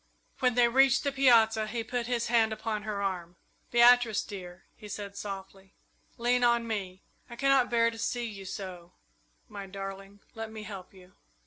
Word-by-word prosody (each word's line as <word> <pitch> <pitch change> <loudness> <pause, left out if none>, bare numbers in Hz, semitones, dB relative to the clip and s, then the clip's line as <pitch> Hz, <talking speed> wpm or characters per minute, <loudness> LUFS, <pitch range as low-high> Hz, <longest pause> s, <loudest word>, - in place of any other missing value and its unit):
When 250 -2 +2
they 245 -1 +5
reached 270 +2 +4
the 280 - 0
piazza 225 -5 +4
he 230 +1 -3
put 240 +1 -3
his 240 -2 0
hand 230 -2 +3
upon 220 -1 -3
her 210 -2 -3
arm. 180 -3 -3 0.3
"Beatrice, 240 -2 +5
dear," 180 -2 -9
he 210 - -12
said, 200 -1 -7
softly, 195 -1 -8 0.4
"lean 245 +1 +1
on 235 -1 +3
me. 190 -4 -4 0.3
I 235 - -8
cannot 270 -1 +3
bear 230 -1 +3
to 225 - -10
see 240 +1 -2
you 200 -4 -8
so 185 -2 -7 0.5
my 200 -3 -8
darling, 195 +1 -8
let 225 -1 -6
me 220 -1 -8
help 195 -3 -9
you!" 185 -1 -18
220 Hz, 175 wpm, -29 LUFS, 195-240 Hz, 0.5 s, they